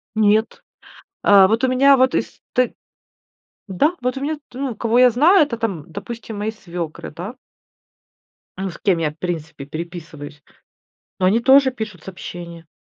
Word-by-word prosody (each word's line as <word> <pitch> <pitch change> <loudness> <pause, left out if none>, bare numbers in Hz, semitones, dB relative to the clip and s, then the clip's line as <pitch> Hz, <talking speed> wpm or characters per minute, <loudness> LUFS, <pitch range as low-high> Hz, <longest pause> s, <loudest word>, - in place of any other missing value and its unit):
Нет! 215 +1 +2 0.6
Э, 195 -2 +7
вот 225 +5 0
у - - +3
меня 275 +2 +5
вот 260 0 +3
из - - -3
ты 250 -1 +1 0.9
да! 250 - +1
Вот 250 +2 -1
у - - -5
меня 300 +2 -2
т 245 - -12
ну, 265 -4 -3
кого 230 +2 +1
я 250 0 +7
знаю, 310 - +5
это 235 -5 -5
там, 195 -10 -4
допустим, 220 +1 -7
мои 215 +1 -2
свекры, 175 -6 -7
да? 180 +10 -7 1.2
Ну, 190 0 -3
с 170 - -10
кем 195 -5 +2
я 155 -2 0
в 150 - -22
принципе 160 -5 -5
переписываюсь, 155 -2 -8 0.8
но 185 - +2
они 210 +5 +3
тоже 265 +2 +6
пишут 215 -8 -7
сообщения. 170 -3 -9
210 Hz, 165 wpm, -20 LUFS, 175-250 Hz, 1.2 s, Э